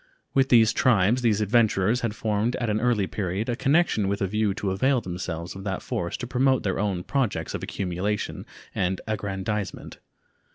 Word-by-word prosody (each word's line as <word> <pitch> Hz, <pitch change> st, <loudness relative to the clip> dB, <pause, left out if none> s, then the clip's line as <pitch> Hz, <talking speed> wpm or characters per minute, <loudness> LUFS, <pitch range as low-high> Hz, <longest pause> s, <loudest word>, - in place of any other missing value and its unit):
With 135 Hz, 0 st, +3 dB
these 115 Hz, -2 st, +6 dB
tribes 115 Hz, 0 st, +3 dB
these 110 Hz, -3 st, +2 dB
adventurers 110 Hz, 0 st, +2 dB
had 115 Hz, -2 st, -2 dB
formed 110 Hz, +2 st, 0 dB
at 120 Hz, -3 st, -1 dB
an 105 Hz, -, +1 dB
early 120 Hz, -5 st, +2 dB
period 95 Hz, +3 st, -3 dB
a 120 Hz, -, 0 dB
connection 135 Hz, -, +2 dB
with 100 Hz, +1 st, -1 dB
a -, -, +1 dB
view 105 Hz, +2 st, 0 dB
to 100 Hz, -3 st, -2 dB
avail 130 Hz, +8 st, +2 dB
themselves 90 Hz, -3 st, -5 dB
of 95 Hz, -, -8 dB
that 95 Hz, -2 st, -3 dB
force 85 Hz, +2 st, -3 dB
to -, -, -5 dB
promote 130 Hz, +1 st, +2 dB
their 95 Hz, -2 st, -1 dB
own 100 Hz, -4 st, -1 dB
projects 110 Hz, -, -1 dB
of -, -, -4 dB
accumulation 95 Hz, +2 st, -3 dB, 0.3 s
and 95 Hz, 0 st, 0 dB
aggrandizement. 100 Hz, -1 st, -4 dB
105 Hz, 175 wpm, -25 LUFS, 95-120 Hz, 0.3 s, these